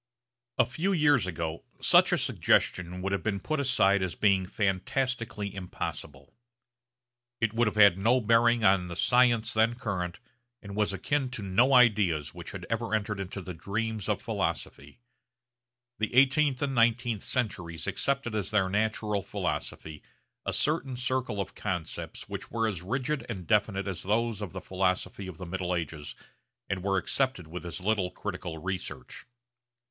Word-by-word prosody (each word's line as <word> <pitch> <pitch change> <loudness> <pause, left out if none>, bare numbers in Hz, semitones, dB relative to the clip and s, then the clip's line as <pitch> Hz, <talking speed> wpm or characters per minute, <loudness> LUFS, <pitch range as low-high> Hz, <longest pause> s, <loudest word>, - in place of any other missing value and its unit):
A - - +5
few 165 +11 -1
years 145 - +3
ago 80 -2 -4 0.2
such - - +6
a - - +3
suggestion 90 +1 +1
would 95 - -1
have 100 - 0
been 100 -2 -1
put 155 - -2
aside 100 -8 +3
as 95 -2 -2
being 95 -3 +2
fantastically 105 +2 -1
impossible. 75 -7 -6 1.1
It 115 -1 0
would 115 0 +2
have 105 - -1
had 100 -3 +6
no 120 +6 +4
bearing 115 0 +3
on 95 -2 +4
the 85 - -6
science 120 +1 +3
then 110 +2 +3
current, 95 -7 -3 0.4
and 100 -2 -9
was 105 -1 +1
akin 130 +8 -1
to 125 -5 -5
no 115 +8 +3
ideas 100 - +4
which - - -8
had - - -7
ever 115 -1 -1
entered 105 -1 -2
into 95 0 -5
the 90 - -6
dreams 105 +4 -3
of - - -1
philosophy. 70 +1 -3 1.0
The 110 +2 -1
eighteenth 135 +1 +4
and 140 -1 -1
nineteenth 115 -2 +2
centuries 85 - -2
accepted 135 -4 -1
as 105 -2 -1
their 105 -3 +2
natural 105 0 0
philosophy 80 -4 -4 0.5
a - - +1
certain 145 -4 0
circle 125 -4 -1
of 100 - -3
concepts 90 -6 -4
which - - -6
were 115 -1 0
as 95 -6 -3
rigid 130 +9 -2
and 95 -7 -5
definite 100 0 +1
as 95 -4 -3
those 110 +1 0
of 100 - -5
the 95 - -6
philosophy 95 +1 -1
of 90 -4 -8
the 90 - -7
middle 90 0 -2
ages, 80 -3 -5 0.5
and 95 -2 -2
were 95 +1 +1
accepted 130 0 -1
with 85 +3 -7
as 85 - -5
little 95 -1 0
critical 90 -4 -5
research. 95 +6 -6
105 Hz, 160 wpm, -29 LUFS, 95-120 Hz, 1.1 s, such